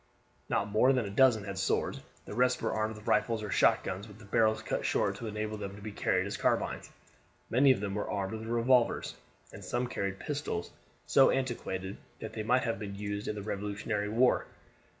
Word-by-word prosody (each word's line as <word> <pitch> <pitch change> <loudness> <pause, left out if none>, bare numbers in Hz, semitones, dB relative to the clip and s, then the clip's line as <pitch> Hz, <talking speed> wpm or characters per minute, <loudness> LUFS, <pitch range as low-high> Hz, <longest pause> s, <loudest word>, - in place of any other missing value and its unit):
Not 100 - +1
more 110 +6 +4
than 125 -4 +1
a 100 - -5
dozen 115 -1 +4
had 100 -1 -5
swords; - - 0 0.3
the - - -7
rest 125 +3 +2
were - - -1
armed 110 0 -1
with 105 - -12
rifles 115 -2 +1
or 105 - -4
shot - - +4
guns, 95 +3 -4
with 105 -1 -13
the 110 - -14
barrels 110 +1 +2
cut - - -2
short - - +1
to 115 - -6
enable 110 0 -3
them 100 -1 -6
to 105 - -11
be 110 - -5
carried 95 -2 +1
as 100 0 -4
carbines. - - 0 0.6
Many 135 +3 +6
of 120 - +1
them 100 -1 -2
were 105 - -3
armed 100 0 -2
with 110 0 -5
revolvers, 120 +1 +2 0.4
and - - -9
some 120 +1 -1
carried 95 -5 -3
pistols 145 - -3 0.3
so 135 - +6
antiquated 100 -7 -2 0.2
that 110 0 -7
they 110 - -3
might 125 +5 +2
have 115 -3 -1
been 100 -2 -5
used 100 0 -4
in 105 - -2
the 105 - -5
revolutionary 105 0 -2
war. 120 +4 +3
110 Hz, 210 wpm, -31 LUFS, 100-120 Hz, 0.6 s, Many